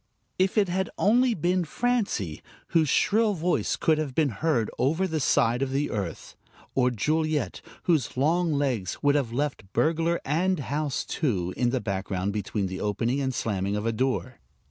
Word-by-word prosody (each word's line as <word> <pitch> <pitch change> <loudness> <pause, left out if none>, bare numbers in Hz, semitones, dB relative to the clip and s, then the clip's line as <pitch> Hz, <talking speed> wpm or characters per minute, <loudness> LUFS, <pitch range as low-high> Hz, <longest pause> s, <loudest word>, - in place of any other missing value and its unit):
If 190 +3 +2
it 205 -2 +4
had 190 +2 -1
only 240 +3 +3
been 180 +2 +1
Francie, 195 - -1 0.3
whose 160 -3 +3
shrill 215 -1 +3
voice 175 +1 0
could 155 -2 +2
have 140 -5 -3
been 155 -3 +3
heard 120 -1 0
over 160 +9 +2
the 160 -3 -1
side 120 -3 +2
of 135 - 0
the 140 +2 -1
earth, 95 -7 -5 0.4
or 125 -1 +3
Juliet, 155 +3 -1 0.2
whose 155 -8 +1
long 165 +5 +2
legs 130 -10 -1
would 145 0 +4
have 140 -6 0
left 130 -6 -3
burglar, 165 +2 +1
and 180 +6 +1
house, 145 0 -2
too, 95 - -1
in 125 -1 +1
the 130 0 -1
background 95 -1 -2
between 105 0 -2
the 95 0 -4
opening 115 +6 0
and 130 -1 0
slamming 100 -5 -1
of 105 +1 -2
a 115 - +2
door. 130 0 -2
140 Hz, 170 wpm, -26 LUFS, 115-165 Hz, 0.4 s, it